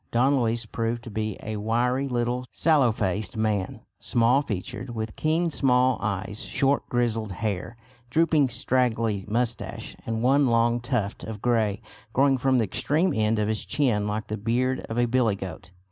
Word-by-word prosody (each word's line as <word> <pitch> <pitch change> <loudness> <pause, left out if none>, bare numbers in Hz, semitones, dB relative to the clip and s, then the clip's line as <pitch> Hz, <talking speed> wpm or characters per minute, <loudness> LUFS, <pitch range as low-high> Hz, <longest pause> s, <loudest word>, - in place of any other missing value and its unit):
Don 130 +4 +3
Luis 115 0 0
proved 115 +1 -3
to 115 - -8
be 110 -1 -3
a 110 0 -4
wiry 120 +5 0
little 125 0 -1
sallow 145 -7 +3
faced 105 0 -2
man, 105 -3 -1 0.2
small 120 +4 +3
featured, 120 +1 -5
with 110 -1 -4
keen 165 +2 +1
small 130 -3 +3
eyes, 100 +1 -3
short 140 +1 0
grizzled 115 -4 0
hair, 105 +3 -3 0.3
drooping 155 -1 +3
straggly 115 -4 0
moustache, 115 0 -2
and 115 0 -3
one 135 +2 +4
long 120 0 +3
tuft 120 -4 -2
of 110 -2 -6
grey 110 -3 +1 0.3
growing 135 0 +3
from 130 0 +2
the 120 - +3
extreme 150 - 0
end 110 0 +1
of 105 -1 +1
his 110 -1 -1
chin 110 -8 +1
like 105 +1 -2
the 110 - -4
beard 125 +5 0
of 115 - -4
a 120 - +3
billygoat. 105 -9 -1
115 Hz, 160 wpm, -26 LUFS, 110-125 Hz, 0.3 s, one